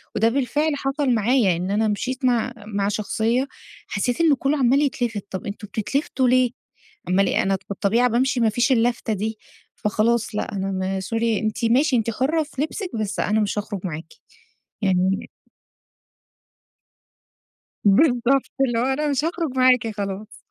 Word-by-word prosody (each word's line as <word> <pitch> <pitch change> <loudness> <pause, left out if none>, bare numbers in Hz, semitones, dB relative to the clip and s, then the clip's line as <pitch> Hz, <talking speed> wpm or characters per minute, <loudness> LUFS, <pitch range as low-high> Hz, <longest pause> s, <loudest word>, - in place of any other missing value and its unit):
وده 225 +2 +3
بالفعل 285 +4 0
حصل 275 0 -1
معايا، 225 -4 +3
إن 180 +3 -3
أنا 215 +1 +2
مشيت 255 +5 -2
مع 245 0 +1
مع 205 -1 -3
شخصية 225 +5 0 0.4
حسيت 245 +8 -1
إن 320 -3 +5
كلّه 275 +3 0
عمال 270 +1 +3
يتلفت، 240 -8 -1
طب 190 - -5
أنتم 205 +1 -6
بتتلفتوا 260 +5 -1
ليه؟ 250 -1 +3 0.6
أما 190 +2 +3
ل - - +2
أنا 195 0 +1
بالطبيعة 210 +5 +2
بامشي 250 +2 +1
مافيش 235 +3 +2
اللفتة 235 -2 +1
دي، 215 +2 -3 0.4
فخلاص 220 +1 0
لأ، - - -2
أنا 195 0 -2
م 190 0 -2
sorry 225 +1 0
أنتِ 215 +2 -1
ماشي، 260 +5 +3
أنتِ 230 -1 +1
حُرة 295 +8 0
في 285 -2 -6
لبسِك، 360 +5 -3
بس 215 -2 -3
أنا 215 +1 +1
مش 205 0 -1
هاخرج 205 -1 -5
معاكِ. 160 -2 -6 0.7
يعني 190 -1 +1 2.6
بالضبط، 250 +4 +3
اللي 240 -4 +2
هو - - +1
أنا 270 +3 0
مش 285 +2 0
هاخرج 330 -5 -2
معاكِ 255 -2 +4
خلاص. 200 +1 -5
230 Hz, 150 wpm, -22 LUFS, 205-260 Hz, 2.6 s, إن